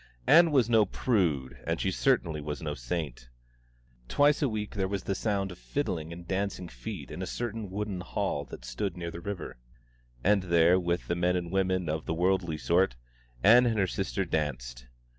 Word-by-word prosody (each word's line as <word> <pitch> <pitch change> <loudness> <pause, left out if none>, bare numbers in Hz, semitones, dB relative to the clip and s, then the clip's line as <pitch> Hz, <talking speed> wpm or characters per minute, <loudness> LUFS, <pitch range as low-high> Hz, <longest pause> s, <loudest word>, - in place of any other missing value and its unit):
Ann 170 +3 +7
was 135 -7 +3
no 110 -3 +4
prude, 85 - 0
and 80 0 0
she 95 - 0
certainly 90 - +1
was 75 0 -4
no 75 -4 -3
saint. 60 -1 -5 0.8
Twice 145 - +3
a 140 - +2
week 105 -2 -3
there 95 -2 0
was 100 -1 -3
the 100 - -1
sound 100 -2 -1
of 90 - -11
fiddling 90 - -3
and 85 0 -9
dancing 95 -1 -2
feet - - -7
in - - -6
a - - -3
certain 115 -4 -4
wooden 100 -1 -3
hall 75 -4 -2
that 65 - -10
stood 100 -4 -3
near 85 -1 -4
the 85 - -8
river; 100 -6 -5 0.7
and 100 0 +4
there, 85 0 +4
with 85 -1 -1
the - - 0
men 90 +1 +1
and 85 -1 -3
women 95 -2 +1
of 80 0 -3
the 80 - -1
worldly 90 -2 +1
sort, 85 -2 +2 0.5
Ann 120 +5 +7
and 115 -2 +1
her 100 - +3
sister 95 +1 -2
danced. - - -3
90 Hz, 190 wpm, -29 LUFS, 80-100 Hz, 0.8 s, Ann